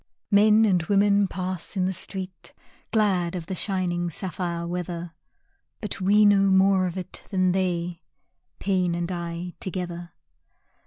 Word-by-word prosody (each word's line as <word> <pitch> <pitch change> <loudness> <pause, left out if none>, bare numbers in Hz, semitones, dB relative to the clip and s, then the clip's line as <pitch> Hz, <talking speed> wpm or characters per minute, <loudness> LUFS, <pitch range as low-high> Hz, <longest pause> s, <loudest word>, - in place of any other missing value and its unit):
Men 215 +2 +6
and 185 -4 +3
women 200 +1 +3
pass 185 0 -4
in 185 - +2
the 190 - 0
street 185 0 -6 0.4
Glad 190 -6 +1
of 175 -3 -4
the 190 - -5
shining 180 -2 -1
sapphire 170 -1 -4
weather, 175 -1 -4 0.7
But 210 -2 -5
we 205 +3 +5
know 200 -1 +5
more 190 -1 +4
of 180 +1 -5
it 185 - -7
than 185 -2 +2
they, 175 -2 -1 0.6
Pain 185 -3 0
and 175 +1 -3
I 170 0 -5
together. 175 -2 -5
185 Hz, 140 wpm, -25 LUFS, 175-195 Hz, 0.7 s, Men